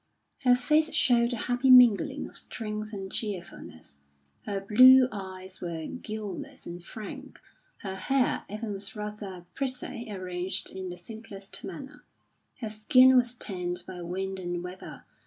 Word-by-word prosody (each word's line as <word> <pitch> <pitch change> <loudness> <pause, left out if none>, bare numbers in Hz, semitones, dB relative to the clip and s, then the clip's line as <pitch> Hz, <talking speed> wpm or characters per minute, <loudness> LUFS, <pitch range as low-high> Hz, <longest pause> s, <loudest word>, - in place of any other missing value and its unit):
Her 250 0 +7
face 305 +5 +2
showed 235 -1 +4
a - - -1
happy 245 +3 0
mingling 245 -5 +6
of - - -15
strength 215 -1 -5
and 195 -2 -6
cheerfulness; 170 - -6 0.5
her 200 -2 -2
blue 255 +6 +7
eyes 190 -1 -8
were 165 -2 -4
guileless 235 +4 -6
and 175 0 -8
frank; 215 +3 -9 0.4
her 190 -2 -4
hair 255 +7 +1
even 210 +1 -4
was 200 +2 -7
rather 210 -4 -6
pretty, 255 -3 -4
arranged 185 -1 -2
in 190 -1 -6
the 180 - -7
simplest 200 0 -8
manner; 265 - -9 0.6
her 220 - -3
skin 255 +5 +6
was 245 -1 +3
tanned 180 -5 -3
by 180 -1 -8
wind 190 +2 -4
and 175 -1 -4
weather. 180 +1 -9
210 Hz, 140 wpm, -28 LUFS, 185-245 Hz, 0.6 s, Her